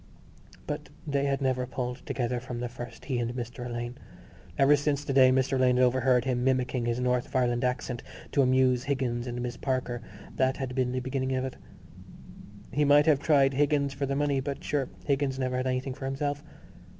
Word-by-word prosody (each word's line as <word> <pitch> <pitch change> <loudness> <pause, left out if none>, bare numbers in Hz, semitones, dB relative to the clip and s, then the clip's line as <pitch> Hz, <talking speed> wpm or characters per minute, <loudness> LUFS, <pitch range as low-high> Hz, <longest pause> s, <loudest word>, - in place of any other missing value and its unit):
But 150 +1 -5 0.2
they 140 -2 0
had 140 0 0
never 130 -1 0
pulled 125 -1 -4
together 120 -1 -1
from 125 -1 -6
the 120 - -2
first, 120 -1 -9
he 130 -4 -1
and 120 +1 -2
Mr 120 0 -5
Alleyne, 120 +1 -5 0.6
ever 140 +2 +6
since 145 0 0
the 135 - -1
day 130 -1 +7
Mr 130 +1 +1
Alleyne 125 -1 +4
had 130 - +4
overheard 125 0 +3
him 125 -2 0
mimicking 130 -2 +1
his 120 +1 0
North 125 -1 +1
of - - -15
Ireland 120 -1 +2
accent 125 -1 -2 0.3
to 140 - +3
amuse 130 -1 +3
Higgins 125 -3 -1
and 120 0 -4
Miss 120 -1 -4
Parker: 130 -3 -2 0.4
that 130 0 +2
had 130 -2 -4
been 125 -1 0
the 130 0 -2
beginning 130 0 -1
of 130 0 -1
it. 130 - -5 1.2
He 150 - +2
might 145 +1 +6
have 155 -4 +4
tried 140 -2 +4
Higgins 140 0 +2
for 140 0 -2
the 135 - -1
money, 145 -1 +1
but 140 +1 -4
sure 140 -3 -1 0.2
Higgins 140 -2 0
never 130 -1 -1
had 130 +1 -1
anything 130 +1 -1
for 135 - -7
himself. 145 +1 -2
130 Hz, 200 wpm, -28 LUFS, 125-140 Hz, 1.2 s, day